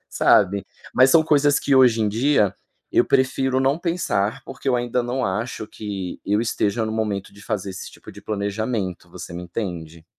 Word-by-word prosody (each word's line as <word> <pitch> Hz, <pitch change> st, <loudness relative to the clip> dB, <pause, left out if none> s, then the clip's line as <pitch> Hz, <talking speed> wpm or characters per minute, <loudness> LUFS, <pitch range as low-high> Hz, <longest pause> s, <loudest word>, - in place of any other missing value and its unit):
sabe. 100 Hz, -1 st, +3 dB, 0.3 s
Mas 130 Hz, +1 st, +6 dB
são 160 Hz, +1 st, +5 dB
coisas 145 Hz, -1 st, +3 dB
que 140 Hz, -, +1 dB
hoje 125 Hz, -4 st, +5 dB
em 105 Hz, -, +2 dB
dia, 115 Hz, -2 st, +2 dB, 0.4 s
eu -, -, +4 dB
prefiro 130 Hz, 0 st, +1 dB
não 135 Hz, +3 st, +2 dB
pensar 165 Hz, -, -1 dB
porque 135 Hz, +1 st, -6 dB
eu 125 Hz, -, +3 dB
ainda 120 Hz, 0 st, -1 dB
não 125 Hz, +1 st, -2 dB
acho 110 Hz, +3 st, -3 dB
que 100 Hz, -5 st, -6 dB
eu 105 Hz, +1 st, +1 dB
esteja 110 Hz, -1 st, 0 dB
no 110 Hz, -, -3 dB
momento 105 Hz, -3 st, -2 dB
de 100 Hz, 0 st, -15 dB
fazer 100 Hz, -3 st, -3 dB
esse 95 Hz, -, -8 dB
tipo -, -, -13 dB
de 100 Hz, +1 st, -13 dB
planejamento, 100 Hz, -1 st, -3 dB
você -, -, -9 dB
me 90 Hz, -, -5 dB
entende? 85 Hz, -4 st, -6 dB
110 Hz, 185 wpm, -22 LUFS, 100-130 Hz, 0.4 s, Mas